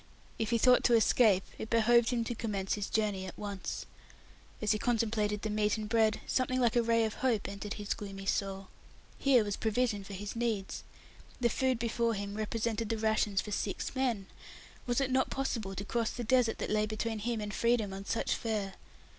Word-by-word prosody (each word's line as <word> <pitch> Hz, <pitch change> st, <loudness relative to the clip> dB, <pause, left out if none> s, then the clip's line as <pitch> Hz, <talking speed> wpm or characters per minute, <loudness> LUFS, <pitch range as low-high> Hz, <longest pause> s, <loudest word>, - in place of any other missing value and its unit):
If 220 Hz, -1 st, 0 dB
he 235 Hz, -, +3 dB
thought 250 Hz, +2 st, +5 dB
to 240 Hz, -, +5 dB
escape, 220 Hz, -4 st, +4 dB, 0.2 s
it 220 Hz, -, -5 dB
behoved 230 Hz, +1 st, +4 dB
him 240 Hz, -2 st, 0 dB
to 235 Hz, -, -3 dB
commence 205 Hz, -4 st, -2 dB
his 205 Hz, -1 st, -3 dB
journey 205 Hz, -4 st, 0 dB
at 185 Hz, -, -9 dB
once. 200 Hz, -2 st, -5 dB, 0.7 s
As 210 Hz, -2 st, +1 dB
he 215 Hz, -, +1 dB
contemplated 215 Hz, -3 st, 0 dB
the 215 Hz, -, -1 dB
meat 210 Hz, 0 st, +1 dB
and 215 Hz, -1 st, -4 dB
bread, 220 Hz, -1 st, +2 dB
something 255 Hz, 0 st, 0 dB
like 240 Hz, -1 st, +2 dB
a 240 Hz, -, +5 dB
ray 230 Hz, 0 st, +3 dB
of 220 Hz, -, -2 dB
hope 240 Hz, -6 st, 0 dB
entered 200 Hz, +1 st, -5 dB
his 205 Hz, -1 st, -2 dB
gloomy 195 Hz, -1 st, -7 dB
soul. 195 Hz, -1 st, -2 dB, 0.5 s
Here 260 Hz, -5 st, +5 dB
was 205 Hz, -1 st, -2 dB
provision 220 Hz, -2 st, 0 dB
for 200 Hz, -, -9 dB
his 200 Hz, +3 st, -6 dB
needs. 225 Hz, -4 st, -2 dB, 0.6 s
The 240 Hz, -2 st, +3 dB
food 260 Hz, +1 st, +1 dB
before 230 Hz, 0 st, 0 dB
him 200 Hz, 0 st, -4 dB
represented 220 Hz, +1 st, -2 dB
the 225 Hz, -, 0 dB
rations 215 Hz, -2 st, +1 dB
of 210 Hz, -, -3 dB
six 200 Hz, -1 st, -2 dB
men. 250 Hz, -7 st, 0 dB, 0.6 s
Was 245 Hz, +2 st, +1 dB
it 265 Hz, -1 st, 0 dB
not 260 Hz, 0 st, +2 dB
possible 225 Hz, -8 st, -2 dB
to 200 Hz, -, -4 dB
cross 230 Hz, +1 st, 0 dB
the 240 Hz, -, -5 dB
desert 245 Hz, -1 st, +3 dB
that -, -, -3 dB
lay 215 Hz, 0 st, +2 dB
between 220 Hz, +1 st, -2 dB
him 230 Hz, +1 st, -2 dB
and 210 Hz, -1 st, -4 dB
freedom 230 Hz, -2 st, +1 dB
on 195 Hz, +1 st, -7 dB
such 225 Hz, -, 0 dB
fare? 210 Hz, -4 st, -2 dB
220 Hz, 200 wpm, -32 LUFS, 205-235 Hz, 0.7 s, thought